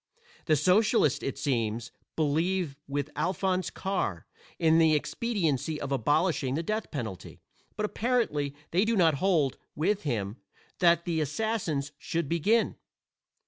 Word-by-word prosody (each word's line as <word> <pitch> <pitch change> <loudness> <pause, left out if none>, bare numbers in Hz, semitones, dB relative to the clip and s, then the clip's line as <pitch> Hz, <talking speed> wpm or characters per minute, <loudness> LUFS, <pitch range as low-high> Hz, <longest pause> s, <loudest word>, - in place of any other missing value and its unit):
The 155 - +4
socialists, 185 - +3
it 135 - -3
seems, 115 -3 -1 0.2
believe 160 +1 0
with 145 +1 -3
Alphonse 185 -1 0
Karr, 185 - -2 0.3
in 160 0 +4
the 160 -1 +5
expediency 160 - -1
of 140 - -5
abolishing 145 +1 +1
the 165 - -1
death 215 +5 -2
penalty; 110 - -6 0.4
but 210 - -1
apparently 210 - 0 0.2
they 180 +4 +3
do 230 +1 +1
not 165 -5 +4
hold, 165 -9 +2 0.2
with 195 +7 +1
him, 110 -7 -2 0.4
that 170 -2 +4
the 165 -3 0
assassins 155 -3 -1
should 165 -2 -2
begin. 200 +9 +2
160 Hz, 130 wpm, -28 LUFS, 140-190 Hz, 0.4 s, the